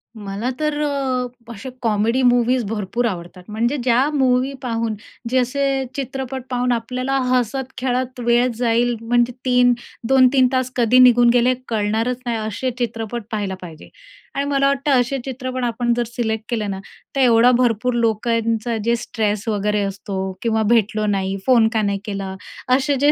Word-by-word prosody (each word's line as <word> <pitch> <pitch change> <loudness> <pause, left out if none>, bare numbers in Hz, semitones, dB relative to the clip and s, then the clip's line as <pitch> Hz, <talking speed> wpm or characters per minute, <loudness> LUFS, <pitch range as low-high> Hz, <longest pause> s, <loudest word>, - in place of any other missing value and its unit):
मला 205 +2 -4
तर 300 -1 -1
अ, 270 -3 -1 0.3
असे 245 +5 -8
कॉमेडी 225 +3 +1
मूवीज 245 0 +3
भरपूर 210 +3 -2
आवडतात. 180 -3 -5
म्हणजे 230 +6 -1
ज्या 255 +3 +3
मूवी 260 -1 +2
पाहून 230 -3 -2 0.3
जे 260 - +1
असे 270 +2 0
चित्रपट 265 -1 -4
पाहून 250 0 0
आपल्याला 255 +3 -1
हसत-खेळत 255 +1 -1
वेळ 240 +1 +4
जाईल, 240 0 +1
म्हणजे 240 +1 +1
3-2-3 250 +1 +3
तास 255 0 0
कधी 245 +1 +4
निघून 245 -1 +6
गेले 245 +1 +4
कळणारच 225 +3 0
नाही, 235 -1 -1
असे 220 +4 -3
चित्रपट 230 -1 -3
पाहायला 205 -3 -2
पाहिजे. 165 -4 -11 0.5
आणि 280 - 0
मला 275 -1 +2
वाटतं 280 +1 0
असे 270 +3 -2
चित्रपण 255 -1 -4
आपण 240 0 0
जर 240 - +2
सिलेक्ट 220 -2 -2
केले 225 -4 -1
ना, 195 -1 -4 0.4
तर 275 - +2
एवढा 240 -1 +5
भरपूर 245 0 +1
लोकांचा 230 0 0
जे 235 0 +3
स्ट्रेस 215 -2 -2
वगैरे 210 -1 0
असतो 195 0 -5 0.2
किंवा 220 -1 +1
भेटलो 215 -2 +2
नाही. 195 -1 -1
"फोन 240 -4 +5
का 220 - +2
नाही 200 -1 0
केला?" 195 -2 -4 0.4
असे 275 +2 +1
जे 290 +2 +5
240 Hz, 155 wpm, -20 LUFS, 220-255 Hz, 0.5 s, निघून